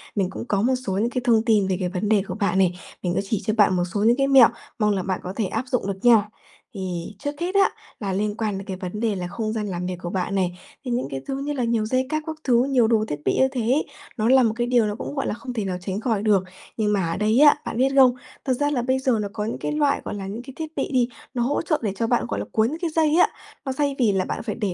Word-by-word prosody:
Mình 195 -3 +1
cũng 190 - -6
có 200 -3 +1
một 250 +4 +2
số 190 - -1
những 210 +5 +1
cái 250 0 -2
thông 225 -3 +4
tin 210 -4 +3
về 185 -1 0
cái 180 -2 -1
vấn 190 +3 -2
đề 215 -2 +4
của - - -4
bạn 200 -3 0
này. 180 -2 +3 0.3
Mình 175 -1 0
sẽ - - +1
chỉ 200 +1 -2
cho 215 - +1
bạn 200 -3 +5
một 175 - +1
số 205 - 0
những 235 +3 +4
cái 275 0 +2
mẹo, 270 -4 +8 0.3
mong 210 -1 +3
là 190 - -1
bạn 185 0 -2
có 185 - -5
thể 220 - 0
áp 225 +6 -2
dụng 250 -5 -1
được 195 -1 -3
nha. 220 -4 +6 0.4
Thì 185 -1 -5
trước 290 +4 -5
hết 360 +3 -2
á, 395 -1 +5 0.3
là 195 -3 -2
liên 205 +2 -1
quan 215 -3 -1
đến 195 - -8
cái 190 - -4
vấn 185 +2 -5
đề 225 -2 0
là 180 -2 -4
không 215 +3 -3
gian 215 -2 -2
làm 180 -2 -3
việc 180 0 -3
của 175 - -4
bạn 190 +2 -2
này, 180 -2 -1 0.3
thì 250 - -3
những 245 +1 -1
cái 135 -1 -5
thứ 270 - -2
như 290 +1 -2
là 260 -4 -1
nhiều 230 -2 +1
dây 255 +4 +1
cáp 310 0 -1
các 315 - -3
thứ, 240 -2 +3
nhiều 260 -4 +3
đồ 220 -1 +2
thiết 150 - -4
bị - - +2
như 265 - +5
thế 255 -3 -2
ấy, 255 +7 +1 0.3
nó 220 +1 +1
là 260 0 +6
một 225 -2 +2
cái 240 0 -1
điều 245 -2 +3
nó 210 -1 -2
cũng, 285 - -6
gọi 275 - -1
là, - - -1
không 240 +3 -7
thể 220 -4 -2
nào 185 -2 -2
tránh 190 +2 -3
khỏi 220 -3 -1
được. 205 -4 +3 0.3
Nhưng 210 -2 +1
mà 185 -5 0
ở - - -2
đây 215 +4 +2
á, 295 0 +8
bạn - - -4
biết 260 +2 +3
không? 260 -2 +7 0.3
Thật 260 - +2
ra 290 +3 0
là 260 -4 0
bây 260 +2 +1
giờ 255 -4 +1
nó 205 - -2
có 210 -2 -3
những 225 - -3
cái - - -3
loại, 295 -2 +1
gọi - - -4
là, 195 -2 -5
những 210 +4 -5
cái 265 +2 -11
thiết 315 -1 -6
bị - - -2
đi, 250 -3 +3 0.3
nó 245 - -1
hỗ 265 +4 0
trợ 315 -2 0
để 205 -3 -1
cho 225 +3 -1
bạn 240 +1 +1
gọi 100 - -3
là 100 - -3
cuốn 220 0 +3
những 315 +4 -5
cái 340 - 0
dây 315 -1 +2
á. 355 - +6 0.4
Nó 265 - -1
xay 280 +1 0
vì 230 -5 +4
là 190 -2 0
bạn - - -4
phải 215 -3 -3
để 205 -5 -2
220 Hz, 320 wpm, -23 LUFS, 195-255 Hz, 0.4 s, mẹo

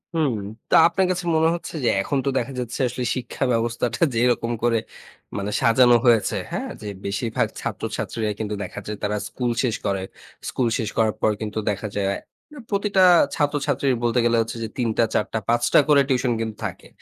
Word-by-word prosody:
হুম, 150 -7 +1 0.3
তো - - +4
আপনার 185 +3 +1
কাছে 175 -1 -2
মনে 160 +1 +4
হচ্ছে 170 - -7
যে - - +4
এখন 140 +8 -1
তো - - +2
দেখা 125 +2 -2
যাচ্ছে 120 -1 -4
আসলে 125 +1 -4
শিক্ষা 125 +1 -4
ব্যবস্থাটা 120 0 -1
যেরকম 120 0 +2
করে 120 -1 +3 0.6
মানে 100 +1 -3
সাজানো 120 +1 +5
হয়েছে, 115 -3 +4 0.2
হ্যাঁ? - - -3
যে 105 - -7 0.2
বেশিরভাগ 105 +3 -1
ছাত্রছাত্রীরা 110 -2 -3
কিন্তু 105 -1 -3
দেখা 95 - -7
যায় 105 0 -4
তারা 105 +1 0
স্কুল 125 -2 -2
শেষ 120 -4 +1
করে। 95 -1 0 0.5
স্কুল 125 - 0
শেষ 110 -4 -2
করার 110 -1 +3
পর 110 - +3
কিন্তু 110 0 -3
দেখা 105 +1 -2
যায় 100 -1 0 0.5
প্রতিটা 200 -2 +2 0.3
ছাত্রছাত্রীর 145 -2 +1
বলতে 120 +1 +2
গেলে 120 0 +3
হচ্ছে 115 +1 -4
যে - - -2
৩ 120 -3 0
টা, - - +5
৪ - - +2
টা, 110 - +1
৫ 120 0 +2
টা - - +8
করে 145 -2 +6
টিউশন 125 -2 +1
কিন্তু 110 -1 -3
থাকে। - - -6
120 Hz, 185 wpm, -23 LUFS, 110-130 Hz, 0.6 s, টা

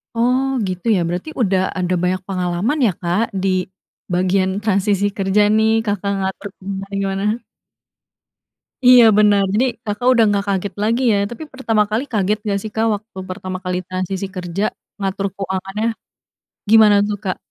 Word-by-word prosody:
Oh, 250 +3 +2 0.2
gitu, 185 +1 -5
ya. 185 - +1
Berarti 180 - -4
udah 190 -4 +2 0.2
ada 185 0 0
banyak 185 +1 0
pengalaman, 185 - -1
ya, 210 - +3
Kak, 180 +5 +1 0.2
di 195 - +1 0.6
bagian 185 +1 +1
transisi 200 -1 +1
kerja, 195 +1 +2 0.2
nih, 220 0 +3 0.2
Kakak 200 -1 -1
ngatur 190 +2 -3
keuangan 195 +1 -6
gimana. 195 0 -2 1.6
Iya, 250 -1 +9
bener. 205 -1 +5
Jadi, 230 +5 +3 0.2
Kakak 210 +4 -2
udah 235 -2 +4
nggak 200 -1 0
kaget 195 0 -1
lagi, 230 +4 +1
ya, - - +3 0.2
tapi 240 +6 -7
pertama 225 -5 +1
kali 225 +4 0
kaget 210 0 +1
gak, 200 - +1
sih, 215 - -6
Kak? 225 +1 +1
Waktu 215 0 -12
pertama 185 0 -5
kali 180 0 -1
transisi 185 +1 -3
kerja, 180 +2 -3 0.4
ngatur 195 0 -2
keuangannya. 195 +3 -3 0.8
Gimana, 215 -2 +7
tuh, 210 - -2
Kak? 185 - -1
200 Hz, 155 wpm, -19 LUFS, 185-215 Hz, 1.6 s, Iya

